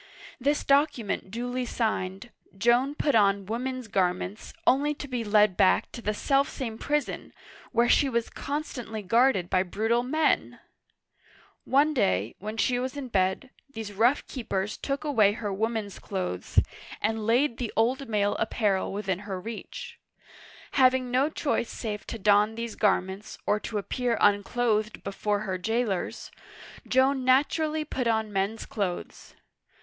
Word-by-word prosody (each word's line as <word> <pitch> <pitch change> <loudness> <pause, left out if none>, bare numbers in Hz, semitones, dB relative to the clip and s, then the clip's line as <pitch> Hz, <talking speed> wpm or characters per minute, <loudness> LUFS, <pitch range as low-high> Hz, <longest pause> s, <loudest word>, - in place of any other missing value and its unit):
This 285 +3 +1
document 275 -9 +1
duly 245 +4 -3
signed, 220 -2 -2 0.3
Joan 240 +6 +3
put 295 -1 +1
on 200 -2 +3
women's 250 +3 -3
garments, 185 +1 -1
only 290 +3 +3
to 285 - -7
be 250 -3 -2
led 210 -2 +4
back 185 - +3
to 235 - -8
the 210 -1 -1
self 275 +4 +2
same 230 -5 -5
prison, 295 0 -2 0.4
where 235 0 +3
she 275 +3 +4
was 235 -2 -1
constantly 245 -7 -5
guarded 230 -2 +3
by 185 +1 +2
brutal 220 +6 0
men! 305 +5 0 1.1
One 290 +3 +3
day, 100 - +1
when 215 +3 -6
she 245 +1 +2
was 260 +3 -4
in 265 -3 -5
bed, 190 +5 0 0.2
these 220 -4 -6
rough 235 +8 +3
keepers 210 -5 -3
took 280 +2 -3
away 220 -9 +3
her 210 -3 -4
woman's 220 0 -2
clothes, 185 - -5 0.4
and 220 0 -1
laid 240 +1 +2
the 240 -3 -3
old 250 +3 +1
male 205 -2 +1
ap 225 - 0
parel 200 -4 0
within 195 -2 -2
her 200 -2 -5
reach. 225 +4 -8 0.7
Having 255 -2 +3
no 265 +4 +3
choice 280 -6 -1
save 210 -3 -5
to - - -5
don 210 +1 +3
these 230 0 -4
garments, 190 0 0
or 210 - +2
to 215 - -4
appear 235 +3 -1
unclothed 215 +1 +1
before 205 +1 -1
her 190 -3 -3
jailers, 220 -1 -2 0.6
Joan 260 +1 +3
naturally 305 +4 +2
put 255 -4 -2
on 220 -2 0
men's 195 +3 -1
clothes. 190 -5 -5
225 Hz, 145 wpm, -27 LUFS, 205-255 Hz, 1.1 s, led